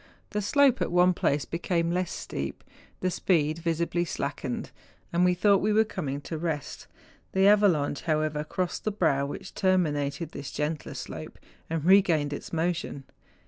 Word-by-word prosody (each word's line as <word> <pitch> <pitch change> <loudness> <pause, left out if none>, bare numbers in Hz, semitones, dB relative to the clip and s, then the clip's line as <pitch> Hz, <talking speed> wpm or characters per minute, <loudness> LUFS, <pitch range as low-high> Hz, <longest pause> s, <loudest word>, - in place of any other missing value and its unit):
The 210 - -1
slope 265 +5 +3
at - - 0
one 180 +1 +5
place 145 -4 0
became 170 0 -1
less 180 0 -1
steep, 70 0 -5 0.4
the 185 - +1
speed 160 -3 +1
visibly 170 +1 0
slackened, 140 -5 -4 0.4
and 175 +1 +3
we 180 0 +4
thought 200 +1 +4
we 215 - +1
were 220 +1 +5
coming 145 -10 -4
to 160 +2 -5
rest; 160 -4 -4 0.5
the 190 0 +3
avalanche, 190 -9 +3
however, 155 -2 0
crossed 180 +3 -3
the 215 - 0
brow 150 -8 +1
which 145 - -7
terminated 160 -5 0
this 140 0 -6
gentler 150 +1 -3
slope, - - -7 0.3
and 160 -1 -2
regained 170 -6 +4
its - - -7
motion. 165 -4 -2
170 Hz, 155 wpm, -27 LUFS, 150-185 Hz, 0.5 s, one